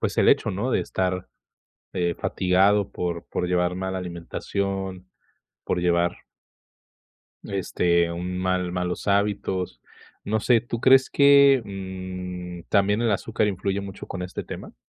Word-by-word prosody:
pues, - - -2
el - - +5
hecho, - - +4
¿no?, 105 +8 -2
de - - +2
estar, 90 -1 -2 0.7
eh, 85 -1 0
fatigado 95 +2 +2
por 85 -1 -3
por 90 - -2
llevar 90 0 +1
mala 95 0 -3
alimentación, 95 +2 -4 0.6
por 90 - 0
llevar 85 0 +1 1.3
este, 85 -3 +1
un 90 +2 -4
mal 90 -1 0
malos 90 +2 -3
hábitos. 100 -8 0 0.4
No 110 +1 0
sé, 115 +1 +3
¿tú 120 -1 -5
crees 130 +2 +5
que, 140 -2 +6
mm, 90 -2 -7
también 100 +2 +3
el 115 -2 +2
azúcar 105 +1 0
influye 100 0 -2
mucho 100 0 -8
con 90 -2 -5
este 90 - -5
tema? - - -8
95 Hz, 135 wpm, -24 LUFS, 90-100 Hz, 1.3 s, que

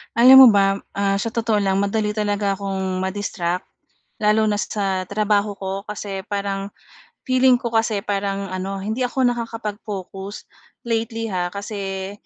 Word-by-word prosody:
Alam 260 +3 +10
mo - - +9
ba, 195 -1 +3 0.2
ah, 200 0 +1
sa 225 +2 -3
totoo 225 -2 +1
lang, 195 -1 +1
madali 210 +1 0
talaga 205 -1 0
akong 190 -1 -3
ma-distract 190 -2 -2 0.6
lalo 215 +1 +3
na 210 -1 0
sa 190 -3 -2
trabaho 205 -1 +1
ko. 190 -1 -4 0.2
Kasi 200 -2 -5
parang, 200 -1 -2 0.6
feeling 255 -1 +4
ko 235 -1 -5
kasi, 225 -3 +1
parang 200 -1 -2
ano, 190 +1 -3
hindi 220 +5 -3
ako 255 +1 0
nakakapag-focus 210 -4 -4 0.4
lately 225 -1 -2
ha, 180 -1 -1
kasi 195 -1 -5
205 Hz, 140 wpm, -21 LUFS, 195-220 Hz, 0.6 s, Alam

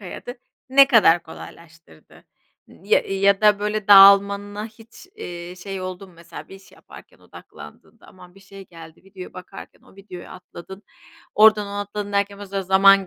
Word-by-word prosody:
hayatı 210 +6 -10 0.3
ne 275 +1 +6
kadar 185 -10 +3
kolaylaştırdı 165 - -17 0.4
n 195 - -20
ya - - +3
eee, 195 - -7
ya 200 0 +2
da 210 -1 +3
böyle, 210 0 -5
dağılmana 200 +1 +4
hiç, 225 +8 -18
eee, 175 - -9
şey 195 +1 -8
oldu 185 +1 -8
mu? - - -21
Mesela 170 0 -13
bir - - -14
iş 195 0 -19
yaparken - - -18
odaklandığında, 75 +1 -17
aman, 180 -1 -18
bir 195 - -20
şey 195 0 -15
geldi 165 0 -16
videoya 195 -1 -13
bakarken, 185 +1 -14
o - - -23
videoyu 190 -3 -13
atladın, 185 +1 -14 0.5
oradan 215 -1 +4
ona 200 0 -6
atladın 205 0 -7
derken 200 0 -2
o 205 - -10
sırada 195 0 -5
zaman 195 +1 +3
195 Hz, 170 wpm, -20 LUFS, 180-205 Hz, 0.5 s, ne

